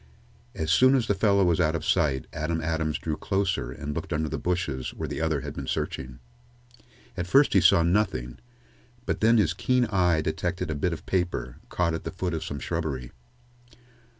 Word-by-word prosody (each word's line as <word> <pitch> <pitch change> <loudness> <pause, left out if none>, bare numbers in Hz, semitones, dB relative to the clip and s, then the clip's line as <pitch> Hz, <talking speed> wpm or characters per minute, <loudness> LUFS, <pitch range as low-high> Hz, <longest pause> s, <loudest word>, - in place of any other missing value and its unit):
As 80 0 -1
soon 130 +7 +6
as 125 -4 +2
the 100 - +1
fellow 100 0 +3
was 85 -3 +2
ought 80 +1 +2
of 80 - -3
sight, 75 -7 +1
Adam 80 +2 -2
Adams 80 -1 -1
drew 80 -2 -3
closer 95 -8 -1
and 75 +3 -5
looked - - -5
under 80 0 -1
the - - -3
bushes 80 -8 -2
where - - -4
the - - -4
other 80 -4 0
had - - -6
been - - -6
searching. 65 -2 -3 1.0
At 90 -1 -3
first 140 +9 +5
he 95 - +5
saw 95 0 +5
nothing, 85 - 0 0.7
but - - -2
then 115 +2 +5
his 90 -6 +3
keen 125 +7 +1
eye 90 -5 +3
detected 85 +2 -2
a - - 0
bit 85 +5 0
of 85 - -6
paper, 90 -9 -2
caught 85 -2 0
at 80 - -4
the - - -4
foot 90 -1 -3
of 80 - -2
some 70 - -5
shrubbery. 70 -5 -3
85 Hz, 195 wpm, -26 LUFS, 75-95 Hz, 1.0 s, soon